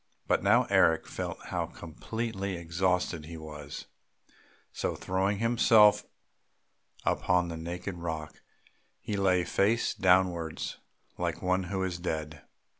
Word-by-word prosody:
But - - +2
now - - +5
Eric 80 0 +4
felt - - -5
how - - -1
completely 100 +3 -5
exhausted 85 -1 0
he 85 0 -8
was; 75 -2 -8 0.9
so - - -2
throwing 95 +2 0
himself 115 -2 +5 1.0
upon 90 -1 +2
the 85 - -4
naked 85 +3 -5
rock, 80 -3 -5 0.6
he 105 - -4
lay 95 -2 +3
face 105 +7 +1
downwards 90 -3 +1 0.4
like - - -2
one 90 0 +1
who 95 +1 -2
is 90 -2 -3
dead. 80 -3 -4
90 Hz, 115 wpm, -29 LUFS, 80-95 Hz, 1.0 s, now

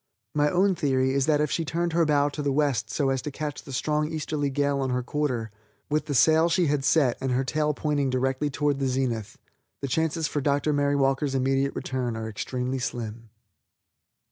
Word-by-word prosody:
My 150 0 +2
own 190 +4 +3
theory 130 -5 +1
is 140 +1 +1
that 150 -1 +3
if 150 - 0
she 165 - 0
turned 170 +2 -2
her 165 0 +3
bow 145 -1 +3
to 150 - -5
the 145 -1 0
west 140 -3 +1
so 140 -3 0
as 135 -1 -1
to 150 - -4
catch 145 -1 -5
the 140 - -11
strong 150 +4 0
easterly 150 -2 -2
gale 140 0 0
on 135 - -1
her 125 0 -1
quarter, 125 -5 -2 0.4
with 155 +1 0
the 145 - -1
sail 160 +7 +5
she 175 +1 +2
had 145 -2 0
set 140 -4 +3
and 130 -1 0
her 130 +2 +1
tail 150 +2 0
pointing 145 -3 0
directly 130 +3 0
toward 145 0 0
the 135 - 0
zenith, 125 -5 -2 0.4
the 140 - -3
chances 160 +3 0
for 145 - -2
Dr. 145 +2 +1
Mary 145 0 +2
Walker's 135 0 +1
immediate 135 +1 +1
return 125 -3 -3
are 110 0 -4
extremely 125 +4 -3
slim. 115 -2 -5
140 Hz, 205 wpm, -26 LUFS, 130-150 Hz, 0.4 s, sail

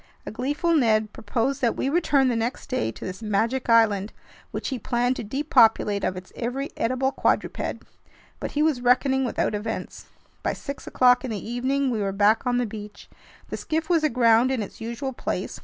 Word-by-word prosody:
A - - -5
gleeful 290 - -1
Ned 220 -7 +2
proposed 265 +5 -2
that 235 -3 +2
we - - -1
return 280 -3 +3
the 240 - 0
next 230 +3 -3
day 180 - 0
to - - -9
this 185 +3 -6
magic 225 +4 0
island, 215 -3 +3 0.4
which - - -4
he 260 -3 -3
planned 245 +3 0
to - - -4
depopulate 225 -4 +3
of 185 - -1
its 185 0 -10
every 260 +4 -3
edible 255 +3 0
quadruped. - - -1 0.5
But - - -5
he 300 - +2
was 305 -6 +1
reckoning 265 +2 +3
without 235 - -1
events. 215 +2 -5 0.3
By - - -1
six 280 0 -7
o'clock 250 0 +4
in 260 - -4
the 215 -2 -5
evening, 260 +3 0
we 220 -3 -1
were 195 -1 0
back 210 +5 +3
on 245 0 +2
the 245 - +1
beach. 210 -1 -9 0.4
The - - -4
skiff 320 +2 -2
was 330 -2 +3
aground 235 -3 +4
in 260 -5 0
its 205 - -11
usual 235 +4 -4
place. - - -4
245 Hz, 190 wpm, -25 LUFS, 220-265 Hz, 0.5 s, o'clock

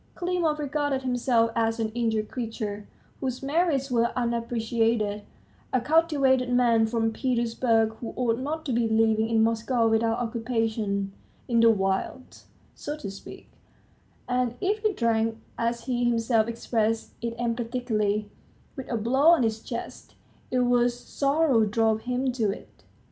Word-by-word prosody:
Klimov 350 -4 0
regarded 290 -2 -1
himself 245 -2 +1
as 225 0 0
an 220 -1 0
injured 220 -2 -1
creature, 220 -4 -5 0.3
whose 260 -1 -3
merits 280 -2 +1
were 235 -1 +2
unappreciated, 230 -3 0 0.5
a 255 - +2
cultivated 275 -4 +2
man 235 -2 +3
from 225 0 0
Petersburg, 230 -2 +1
who 235 - -6
ought 235 -1 0
not 310 +4 -4
to 265 - -1
be 230 0 +2
living 220 0 +2
in 225 -1 +3
Moscow 230 +1 +1
without 225 +1 +2
occupation 225 -4 -2 0.3
in 235 -2 +2
the 230 0 +6
wilds, 195 +4 -2 0.3
so 295 +1 -6
to 275 -10 -6
speak; 195 - -12 0.8
and 250 -1 0
if 415 +3 0
he 430 -1 +2
drank, 225 - 0 0.2
as 235 0 -2
he 245 -1 -1
himself 230 -1 +2
expressed 225 -1 -1
it 230 0 -3
emphatically, 230 -3 -1 0.5
with 265 -3 -7
a 235 - 0
blow 260 +7 +2
on 335 -6 +6
his 220 -1 -1
chest, 235 0 -7 0.3
it 255 - +1
was 245 0 +2
sorrow 280 -3 +2
drove 220 +1 +1
him 255 +1 0
to 230 -4 0
it. 195 - -8
235 Hz, 145 wpm, -26 LUFS, 225-255 Hz, 0.8 s, the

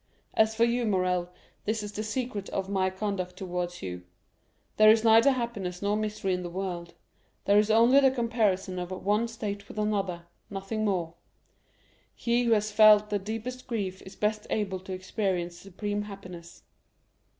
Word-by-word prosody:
As 220 0 +3
for 230 - +3
you, 235 0 +1
Morrel, 180 -3 +1 0.4
this 215 0 -1
is 205 - -5
the 210 - -4
secret 215 -2 -3
of 190 -1 -2
my 190 -1 +1
conduct 185 -2 -4
towards 180 - -4
you. 90 -1 -5 0.8
There 215 0 +8
is 220 0 +5
neither 225 +3 +6
happiness 230 -9 -2
nor 205 +1 +1
misery 210 -3 -1
in 180 - -1
the 175 - -5
world; 175 -2 -5 0.5
there 205 +1 +5
is 210 +1 +2
only 235 +5 +6
the 270 -1 +5
comparison 215 -7 0
of 180 0 -4
one 205 +5 0
state 205 -3 -5
with - - -11
another, 195 -5 -1 0.3
nothing 200 +2 -3
more. 175 -5 -1 1.0
He 240 +1 +1
who 230 - +4
has 215 0 +1
felt 210 0 +6
the 205 - +1
deepest 225 +5 -6
grief 195 -6 -3
is 190 - -12
best 210 0 -1
able 195 -3 -1
to 190 +1 -10
experience 185 -2 -2
supreme 205 +2 -4
happiness. 185 -4 -10
205 Hz, 165 wpm, -28 LUFS, 185-220 Hz, 1.0 s, There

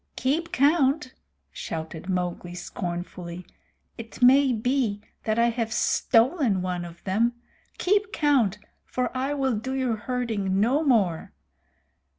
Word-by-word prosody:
"Keep 315 +6 -1
count!" 285 -3 +2 0.4
shouted 160 +2 -6
Mowgli 180 -1 -2
scornfully. 175 0 -6 0.5
"It 225 0 -9
may 265 +2 +6
be 240 -2 0 0.3
that 215 0 0
I 235 0 +4
have 230 -1 -2
stolen 235 - +2
one 180 -1 -3
of 170 0 -12
them. 225 +5 +1 0.4
Keep 405 +2 +1
count, 265 - +2 0.3
for 250 0 -3
I 270 +3 -1
will 265 -3 +1
do 260 +5 -3
your 255 -4 0
herding 215 -6 -1
no 260 +9 +2
more. 205 - +1
235 Hz, 125 wpm, -25 LUFS, 185-270 Hz, 0.5 s, may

